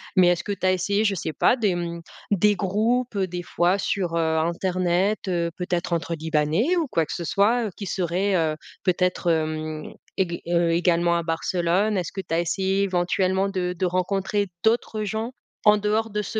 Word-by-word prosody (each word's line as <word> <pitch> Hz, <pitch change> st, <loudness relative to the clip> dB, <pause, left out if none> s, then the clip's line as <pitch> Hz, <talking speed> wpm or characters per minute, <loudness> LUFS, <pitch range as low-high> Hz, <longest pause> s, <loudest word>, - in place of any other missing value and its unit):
Mais 185 Hz, -2 st, +6 dB
est-ce 175 Hz, -1 st, +1 dB
que 205 Hz, -, -1 dB
tu 185 Hz, -1 st, -4 dB
as 185 Hz, -, +5 dB
essayé, 200 Hz, +3 st, +1 dB
je 205 Hz, -2 st, +2 dB
sais 160 Hz, -4 st, -3 dB
pas 250 Hz, -, +3 dB
des, 210 Hz, -6 st, +1 dB
mmh, 170 Hz, -1 st, -4 dB, 0.3 s
des 205 Hz, +1 st, +4 dB
groupes, 220 Hz, +5 st, 0 dB
heu, 190 Hz, -1 st, +1 dB
des 175 Hz, 0 st, -5 dB
fois 175 Hz, +2 st, +1 dB
sur, 185 Hz, -3 st, -1 dB
heu, 160 Hz, -1 st, +1 dB
internet, 180 Hz, +4 st, +1 dB
heu, 170 Hz, -2 st, 0 dB
peut-être 180 Hz, -1 st, -2 dB
entre 170 Hz, 0 st, -1 dB
libanais 160 Hz, -, +1 dB
ou 330 Hz, -3 st, 0 dB
quoi 165 Hz, -10 st, 0 dB
que -, -, -6 dB
ce 170 Hz, -, -4 dB
soit, 225 Hz, +7 st, +2 dB
heu, -, -, -2 dB
qui 205 Hz, -, -5 dB
serait, 185 Hz, +2 st, 0 dB
heu, 160 Hz, -3 st, +1 dB, 0.3 s
peut-être, 180 Hz, -1 st, +1 dB
hem, 155 Hz, -1 st, -2 dB, 0.2 s
ég 175 Hz, -3 st, -1 dB
heu, 170 Hz, -1 st, +2 dB
également 170 Hz, 0 st, +2 dB
à -, -, 0 dB
Barcelone? 175 Hz, +5 st, 0 dB
Est-ce 175 Hz, -3 st, -3 dB
que 195 Hz, -, -3 dB
tu 165 Hz, -, -6 dB
as 165 Hz, -, +2 dB
essayé 190 Hz, +3 st, 0 dB
éventuellement 190 Hz, +1 st, +1 dB
de 180 Hz, -2 st, -2 dB
de 185 Hz, -, 0 dB
rencontrer 190 Hz, +3 st, 0 dB, 0.2 s
d'autres 220 Hz, -1 st, +1 dB
gens 220 Hz, +3 st, -3 dB, 0.3 s
en 210 Hz, 0 st, +7 dB
dehors 215 Hz, +2 st, 0 dB
de 210 Hz, 0 st, -2 dB
ce 220 Hz, -, -3 dB
185 Hz, 200 wpm, -24 LUFS, 170-205 Hz, 0.3 s, en